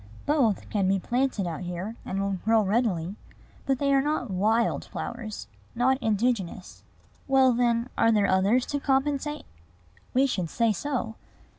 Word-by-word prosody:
Both 265 -9 +1
can 200 -3 +1
be 195 +1 +3
planted 240 +1 -1
out 170 -1 -4
here, 180 +5 -5
and 195 - -3
will 195 -1 -1
grow 220 0 +3
readily; 200 -3 0 0.5
but 270 -1 +2
they 280 +1 +1
are 270 - +4
not 280 -6 -2
wild 220 +5 +1
flowers, 220 - -6 0.3
not 260 +3 +2
indigenous. 215 -5 -1 0.5
"Well, 265 -2 +5
then, 235 0 +1
are 230 0 +5
there 210 -2 +3
others 200 +7 +3
to 285 - +1
compensate?" 280 +2 0 0.7
We 265 +2 +5
should 185 -11 -2
say 230 +2 +1
so. 235 -1 -3
230 Hz, 150 wpm, -26 LUFS, 195-265 Hz, 0.7 s, Well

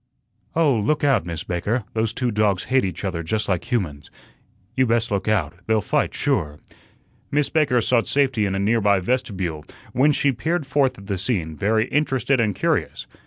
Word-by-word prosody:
"Oh, 160 -4 +4
look 145 +9 0
out, 135 - +2
Miss 85 -1 -4
Baker. 100 +7 -1
Those 110 -1 0
two 120 +1 -1
dogs 105 -3 +1
hate 130 0 +2
each 95 0 -4
other 85 -3 -2
just 105 +6 -2
like 95 -3 -2
humans. 75 -12 -2 0.7
You 130 -1 +3
best 115 0 +1
look 100 0 -1
out. 95 -9 +1
They'll 110 0 +3
fight - - 0
sure." 75 -1 -1 0.7
Miss 145 -1 +1
Baker 145 -6 +2
sought 115 +1 +1
safety 130 -7 +1
in 95 - -2
a - - -1
nearby 100 -1 +3
vestibule, 95 - -2 0.3
whence 145 +4 +3
she 140 - +2
peered 160 +5 -2
forth 135 -1 +1
at 100 - -12
the 100 -2 -3
scene, 90 -7 -2
very 110 +6 +1
interested 135 -3 +1
and 105 -4 +1
curious. - - -1
110 Hz, 180 wpm, -22 LUFS, 95-130 Hz, 0.7 s, Oh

